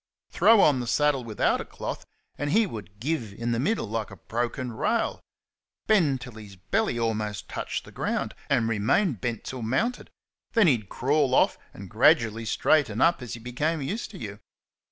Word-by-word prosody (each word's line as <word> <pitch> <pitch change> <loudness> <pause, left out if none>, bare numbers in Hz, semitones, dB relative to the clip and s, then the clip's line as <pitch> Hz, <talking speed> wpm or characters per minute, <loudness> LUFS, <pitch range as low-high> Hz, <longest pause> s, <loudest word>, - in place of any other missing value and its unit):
Throw 225 -2 +6
on 145 -7 +4
the 120 - -4
saddle 145 +1 +2
without 110 -3 0
a - - -4
cloth, - - -7 0.3
and 145 - -3
he 220 +7 +4
would 105 - -9
"give" 120 -5 -2
in 115 +2 -2
the 115 - 0
middle 200 - 0
like 110 0 -3
a - - -10
broken 120 +2 -3
rail 110 - 0 0.7
bend 155 -12 +3
till 125 -2 -9
his 105 -3 -11
belly 125 - -1
almost 105 -2 -2
touched - - -4
the - - -13
ground, - - -2 0.2
and 115 - +2
remain 115 - +2
bent 115 +1 -4
till 130 -2 -6
mounted; 175 - -1 0.4
then 225 -4 +5
he'd 120 - +2
crawl 140 0 +1
off - - +4 0.2
and - - -10
gradually 115 0 +3
straighten 115 -1 +2
up 170 -3 +3
as 125 -2 -6
he - - -9
became 145 +8 -2
used 190 - -3
to 205 - -10
you. 100 -2 -7
125 Hz, 180 wpm, -26 LUFS, 110-150 Hz, 0.7 s, Throw